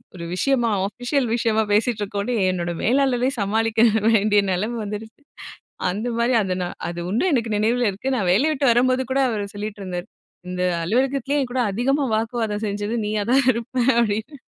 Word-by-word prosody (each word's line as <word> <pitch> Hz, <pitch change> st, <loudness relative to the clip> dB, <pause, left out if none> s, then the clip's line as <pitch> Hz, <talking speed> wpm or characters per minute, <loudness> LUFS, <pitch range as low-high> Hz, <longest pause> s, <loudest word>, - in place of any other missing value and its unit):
ஒரு 170 Hz, -, -7 dB
விஷயமா 240 Hz, +2 st, +1 dB, 0.2 s
அஃபிஷியல் 245 Hz, +5 st, -1 dB
விஷயமா 225 Hz, -2 st, +1 dB
பேசிட்டு 220 Hz, 0 st, +1 dB
இருக்கோன்னு." 205 Hz, +4 st, -2 dB, 0.2 s
என்னோட 175 Hz, -1 st, -3 dB
மேலாளரே 255 Hz, +1 st, +2 dB
சமாளிக்க 220 Hz, +2 st, +1 dB, 0.3 s
வேண்டிய 210 Hz, -1 st, +4 dB
நிலைமை 215 Hz, +6 st, -2 dB
வந்துருச்சு 220 Hz, +5 st, -7 dB, 0.7 s
அந்தமாரி 235 Hz, +4 st, -1 dB
அது 185 Hz, -1 st, -1 dB
நான் 175 Hz, -, -6 dB
அது 175 Hz, 0 st, -6 dB
உண்டு 225 Hz, -, +1 dB
எனக்கு 235 Hz, -4 st, 0 dB
நினைவில 230 Hz, +2 st, +1 dB
இருக்கு. 260 Hz, +8 st, -3 dB
நான் 185 Hz, -5 st, 0 dB
வேலைய 280 Hz, +11 st, +3 dB
விட்டு 275 Hz, -4 st, +3 dB
வரும்போது 255 Hz, +2 st, +2 dB
கூட 270 Hz, -, +1 dB
அவரு 210 Hz, -3 st, -2 dB
சொல்லிட்டு 205 Hz, 0 st, -6 dB
இருந்தாரு. 180 Hz, -1 st, -5 dB, 0.4 s
"இந்த 180 Hz, 0 st, -2 dB, 0.2 s
அலுவலகத்திலேயே 270 Hz, +8 st, 0 dB
என்கூட 250 Hz, 0 st, -2 dB
அதிகமா 270 Hz, +7 st, +1 dB
வாக்குவாதம் 225 Hz, -1 st, -2 dB
செஞ்சது 205 Hz, +3 st, -2 dB
நீயா 210 Hz, 0 st, -1 dB
தான் 270 Hz, +1 st, +5 dB
இருப்பேன்." 240 Hz, +2 st, -1 dB
அப்பிடின்னு 225 Hz, +6 st, -1 dB
225 Hz, 155 wpm, -22 LUFS, 205-250 Hz, 0.7 s, தான்